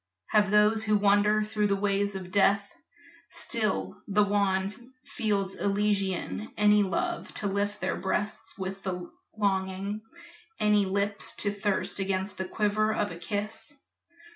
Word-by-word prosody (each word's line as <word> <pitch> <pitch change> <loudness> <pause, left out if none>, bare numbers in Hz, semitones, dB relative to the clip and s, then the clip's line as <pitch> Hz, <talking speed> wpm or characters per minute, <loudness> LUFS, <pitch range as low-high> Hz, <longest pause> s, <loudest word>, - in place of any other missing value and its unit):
Have 210 -2 +4
those 210 +1 +4
who 215 0 +3
wander 205 +1 +4
through 210 0 0
the 200 - +2
ways 200 0 0
of 185 -1 -6
death, 200 +1 +3
The - - -28 0.5
still 215 - -1
wan 205 +3 +1
fields 205 -8 -1
Elysian, 195 - -1
any 210 0 +5
love 190 -4 -1
To - - -4
lift 205 +1 -1
their - - -1
breasts 210 +2 -3
with 195 0 -5 0.5
longing, 195 0 -1 0.6
any 210 -2 +3
lips 200 +1 0
To 205 - 0
thirst 205 -1 -1
against 190 0 -2
the 190 - -1
quiver 215 +1 +1
of 210 -1 -1
a - - -6
kiss? 210 +9 -4
205 Hz, 135 wpm, -28 LUFS, 195-210 Hz, 0.6 s, any